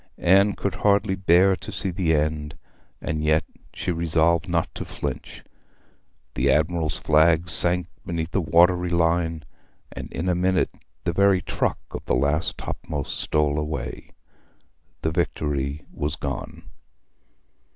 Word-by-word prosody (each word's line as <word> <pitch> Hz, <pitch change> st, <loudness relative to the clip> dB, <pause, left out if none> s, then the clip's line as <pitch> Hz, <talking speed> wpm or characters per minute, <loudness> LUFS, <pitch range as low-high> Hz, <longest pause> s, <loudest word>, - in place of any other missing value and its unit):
Anne 100 Hz, +3 st, +4 dB
could 100 Hz, -, -2 dB
hardly 100 Hz, -1 st, +3 dB
bear 95 Hz, 0 st, +4 dB
to -, -, -8 dB
see 95 Hz, -, -2 dB
the 85 Hz, -2 st, 0 dB
end, 75 Hz, -1 st, -2 dB, 0.4 s
and 75 Hz, 0 st, -3 dB
yet 75 Hz, 0 st, +3 dB, 0.3 s
she -, -, -3 dB
resolved 85 Hz, +1 st, +2 dB
not 85 Hz, -1 st, +1 dB
to -, -, -5 dB
flinch. -, -, -6 dB, 0.9 s
The 65 Hz, +3 st, +1 dB
admiral's 80 Hz, +2 st, +1 dB
flag 80 Hz, +2 st, +3 dB
sank 90 Hz, +1 st, +5 dB, 0.2 s
behind 85 Hz, -2 st, -3 dB
the 100 Hz, -, +1 dB
watery 90 Hz, +2 st, +3 dB
line, 85 Hz, -2 st, 0 dB, 0.5 s
and -, -, -8 dB
in 85 Hz, -, -4 dB
a 90 Hz, -, +3 dB
minute 90 Hz, +1 st, +1 dB, 0.3 s
the -, -, -1 dB
very 100 Hz, -2 st, +3 dB
truck -, -, -1 dB
of -, -, -6 dB
the -, -, +1 dB
last 70 Hz, +5 st, 0 dB
topmast 75 Hz, -3 st, -5 dB
stole 75 Hz, -1 st, 0 dB
away. 75 Hz, +1 st, -5 dB, 0.9 s
The 80 Hz, -, 0 dB
Victory 70 Hz, -2 st, -2 dB
was 75 Hz, 0 st, -2 dB
gone. 80 Hz, +2 st, -6 dB
85 Hz, 135 wpm, -24 LUFS, 75-90 Hz, 0.9 s, sank